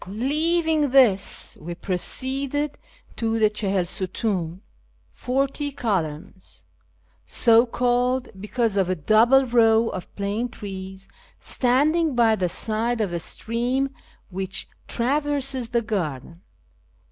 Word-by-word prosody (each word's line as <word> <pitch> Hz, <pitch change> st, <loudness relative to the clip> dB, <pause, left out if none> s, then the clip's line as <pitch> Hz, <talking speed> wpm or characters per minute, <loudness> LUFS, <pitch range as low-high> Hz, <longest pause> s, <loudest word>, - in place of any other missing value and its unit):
Leaving 305 Hz, -, +1 dB
this, 245 Hz, -7 st, +3 dB
we 170 Hz, +2 st, -6 dB
proceeded 270 Hz, -, -2 dB, 0.4 s
to 225 Hz, -1 st, -1 dB
the 215 Hz, -1 st, +3 dB
Chaliil 195 Hz, -4 st, 0 dB
sutun 185 Hz, -1 st, -3 dB, 0.3 s
(" -, -, -38 dB
forty 275 Hz, +3 st, -1 dB
columns 185 Hz, -, -4 dB, 0.3 s
"), -, -, -39 dB, 0.2 s
so 230 Hz, 0 st, +4 dB
called 245 Hz, +1 st, +1 dB
because 215 Hz, 0 st, -1 dB
of 190 Hz, -2 st, +2 dB
a 185 Hz, -, +1 dB
double 225 Hz, -, +4 dB
row 230 Hz, -2 st, +4 dB
of 185 Hz, -, -7 dB
plane 205 Hz, +4 st, -2 dB
trees 190 Hz, -3 st, -8 dB, 0.3 s
standing 295 Hz, +4 st, +1 dB
by 230 Hz, -2 st, +4 dB
the 185 Hz, -4 st, -1 dB
side 225 Hz, +5 st, -1 dB
of 200 Hz, -5 st, -1 dB
a 170 Hz, -, -1 dB
stream 245 Hz, +8 st, -1 dB, 0.4 s
which 190 Hz, +1 st, -4 dB, 0.2 s
traverses 275 Hz, -1 st, 0 dB
the 235 Hz, -1 st, 0 dB
garden. 170 Hz, -, -4 dB
230 Hz, 115 wpm, -24 LUFS, 195-260 Hz, 0.4 s, so